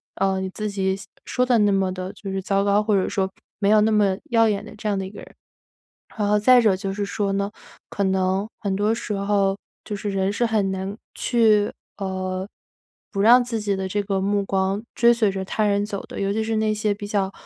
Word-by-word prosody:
呃， 190 -1 +1
你 190 0 -4
自 215 +2 -3
己 190 -1 0
想 195 - -10 0.2
说 250 - 0
得 245 -2 +4
那 205 -1 +4
么 195 -1 +1
地 185 +1 -5
就 200 - -8
是 190 0 -3
糟 195 +1 +1
糕， 200 +1 +3
或 210 -1 +2
者 190 - +1
说 190 -1 -1 0.3
没 200 - +2
有 215 0 +6
那 220 +1 +3
么 205 -3 +3
耀 230 -1 +4
眼 205 -1 -1
的 220 - -11
这 215 - -5
样 200 - 0
的 190 - -2
一 - - -7
个 205 - -11
人。 - - -13 0.8
然 210 -2 0
后 210 0 +3
再 250 +4 +6
者 215 -4 +4
就 195 +1 -4
是 205 +1 -2
说 200 +1 -1
呢， 200 +1 -1 0.4
可 200 - -2
能 190 +1 +1
很 200 -2 -1
多 205 +3 +1
时 225 - -4
候， 200 -1 +1 0.3
就 210 - -4
是 205 +1 -4
人 195 0 0
是 240 - 0
很 215 -4 +1
难 190 +2 -4 0.2
去， 215 -4 +3 0.3
呃， 185 -1 -3 0.6
不 195 - -1
让 240 +4 +7
自 230 -2 -2
己 205 -1 0
的 190 0 -3
这 205 +2 -1
个 195 -1 -1
目 200 +1 +1
光 195 +2 0
追 235 0 +5
随 225 -3 +2
着 190 0 -4
他 215 - -1
人 205 0 +1
走 200 -2 -5
的， - - -7
尤 195 0 0
其 220 +1 0
是 225 0 -1
那 215 0 +1
些 215 0 0
比 205 0 -7
较 200 -2 0
200 Hz, 260 characters per minute, -23 LUFS, 195-215 Hz, 0.8 s, 让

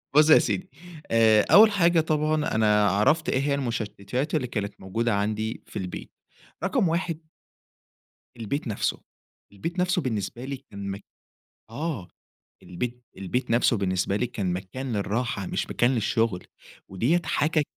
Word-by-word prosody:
بُص 150 +1 +6
يا 155 - +9
سيدي، 185 0 -2 0.4
آآ 110 -2 +5
أول 215 +1 +8
حاجة 170 -4 +3
طبعًا، 155 -2 0
أنا 105 -2 +4
عرفت 110 - +2
إيه - - +1
هي 140 0 +1
المشتتات 120 +2 -3
اللي 130 -5 0
كانت 105 -4 -3
موجودة 110 +4 -1
عندي 110 +2 -2
في - - -6
البيت. 90 -2 -6 0.5
رقم 195 -2 +2
1 165 -1 -1 1.2
البيت 120 +6 -3
نفسه، 105 - -1 0.5
البيت 165 - -5
نفسه 180 -2 +1
بالنسبة 120 0 -3
لي 140 0 -4
كان 100 -7 -9
مك 100 +1 -7 0.7
آه، 135 - -4 0.6
البيت 120 +7 -5
البيت 115 +7 -2
نفسه 120 0 +3
بالنسبة 95 0 0
لي 125 - 0
كان 100 -6 -2
مكان 100 +8 -5
للراحة 105 0 -2
مش - - -2
مكان 120 - +2
للشغل، 110 -3 0 0.4
وديّة 130 - +1
حاجة 155 0 +1
120 Hz, 140 wpm, -26 LUFS, 100-150 Hz, 1.2 s, يا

